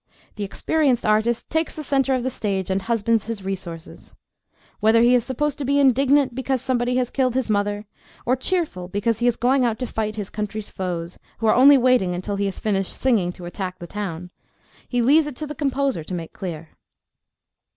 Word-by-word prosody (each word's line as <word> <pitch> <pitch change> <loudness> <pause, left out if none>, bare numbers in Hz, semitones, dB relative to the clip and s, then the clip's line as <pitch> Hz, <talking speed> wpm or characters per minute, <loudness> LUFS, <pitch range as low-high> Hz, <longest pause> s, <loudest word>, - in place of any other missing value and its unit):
The 210 - -4
experienced 265 +5 0
artist 220 +2 +1
takes 320 0 0
the 310 - -5
centre 270 -1 +1
of 250 - -2
the 260 - -1
stage 195 -5 -2
and 190 +1 0
husbands 225 0 0
his 225 -4 -4
resources. 180 -3 -7 0.6
Whether 220 +2 +4
he 240 +1 +5
is 245 -2 +4
supposed 285 +4 -2
to - - -2
be 280 +2 +2
indignant 270 0 +4
because 265 +1 -1
somebody 250 -1 0
has 250 -1 0
killed 255 -3 +1
his 260 -4 0
mother, 205 0 0 0.4
or 250 - +3
cheerful 265 - -2
because 210 +4 -1
he 240 - +2
is 240 - +2
going 255 +2 +2
out 230 -2 +1
to 255 - -3
fight 215 -2 -3
his 205 -3 -5
country's 210 0 -5
foes, 175 -2 -4 0.2
who 225 - -3
are 215 - +5
only 275 +3 +7
waiting 245 -8 +3
until 200 +3 -3
he 200 - 0
has 195 -2 -3
finished 195 -3 -1
singing 220 -9 +2
to 175 - -10
attack 180 +1 -5
the 175 - -8
town, 180 -2 -5 0.6
he 245 -1 +1
leaves 295 +5 +5
it 295 - -6
to 305 - -5
the 300 - -6
composer 275 - -1
to 180 +4 -5
make 165 -2 -6
clear. 165 -5 -6
230 Hz, 205 wpm, -22 LUFS, 195-260 Hz, 0.6 s, only